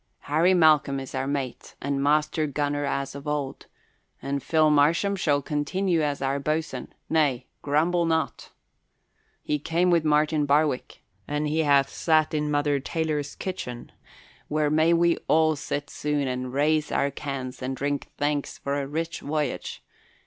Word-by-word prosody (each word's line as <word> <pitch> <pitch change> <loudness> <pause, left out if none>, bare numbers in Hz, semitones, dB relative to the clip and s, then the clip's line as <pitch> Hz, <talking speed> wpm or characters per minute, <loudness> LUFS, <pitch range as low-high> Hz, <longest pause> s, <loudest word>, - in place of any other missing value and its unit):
Harry 165 +6 +3
Malcolm 150 -5 +4
is 135 - -8
our 135 0 -2
mate 135 -3 -4
and 140 0 -2
master 150 +2 +2
gunner 145 0 -1
as 140 -1 -2
of 140 +1 -9
old, 145 -2 -3 0.5
and 140 0 -3
Phil 155 0 +3
Marsham 165 +7 +3
shall 145 -7 +1
continue 165 +5 0
as 145 -2 -1
our 135 +1 0
boatswain 155 -2 -3 0.2
nay, 140 -6 +1 0.2
grumble 165 +4 +1
not! 160 -1 -1 0.9
He 150 - -1
came 170 +4 +1
with 170 -2 +3
Martin 150 0 +2
Barwick 145 -2 +1 0.2
and 150 +1 -1
he 155 +2 0
hath 140 -3 +4
sat 155 -2 +2
in 150 -1 0
Mother 145 -1 +1
Taylor's 150 0 -2
kitchen, 125 -11 -6 0.6
where 150 0 0
may 155 +2 +4
we 170 0 +3
all 155 0 +4
sit 145 0 -4
soon 145 -2 -1
and 125 0 -3
raise 150 +3 +1
our 140 0 +1
cans 135 -3 -5
and 130 +1 -3
drink 145 0 -2
thanks 145 -1 -1
for 140 +1 -2
a 135 - -4
rich 165 +3 -3
voyage. 150 0 -3
150 Hz, 155 wpm, -26 LUFS, 140-155 Hz, 0.9 s, Malcolm